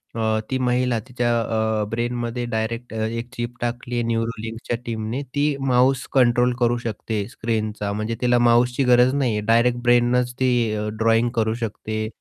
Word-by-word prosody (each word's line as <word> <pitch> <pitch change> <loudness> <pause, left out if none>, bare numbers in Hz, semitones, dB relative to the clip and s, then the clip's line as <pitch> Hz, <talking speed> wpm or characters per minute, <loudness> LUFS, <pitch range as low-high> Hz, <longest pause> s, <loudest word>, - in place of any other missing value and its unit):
अ, 110 -1 +1
ती 130 - 0
महिला 125 -1 +1
तिच्या 120 -1 -1
अ, 110 -1 0
ब्रेनमध्ये 120 +1 -2
डायरेक्ट 115 +1 -3
अ, - - -4
एक 115 +2 -5
चिप 120 0 -5
टाकली 120 0 -3
आहे 120 - 0
न्यूरोलिंगच्या 115 0 -3
टीमने 115 +3 -3
ती 145 +1 +2 0.2
माऊस 130 +1 +3
कंट्रोल 125 -1 +4
करू 120 0 +2
शकते 110 -2 -4
स्क्रीनचा 110 -3 -2
म्हणजे 110 +2 -2
तिला 125 0 +3
माऊसची 120 +2 +3
गरज 125 +1 +5
नाही 135 -5 +1
आहे 105 - -1
डायरेक्ट 120 +2 +3
ब्रेननच 120 +1 +3
ती 130 -1 +3 0.5
ड्रॉइंग 115 +1 +3
करू 110 0 +1
शकते. 110 +1 -4
120 Hz, 155 wpm, -22 LUFS, 110-125 Hz, 0.5 s, गरज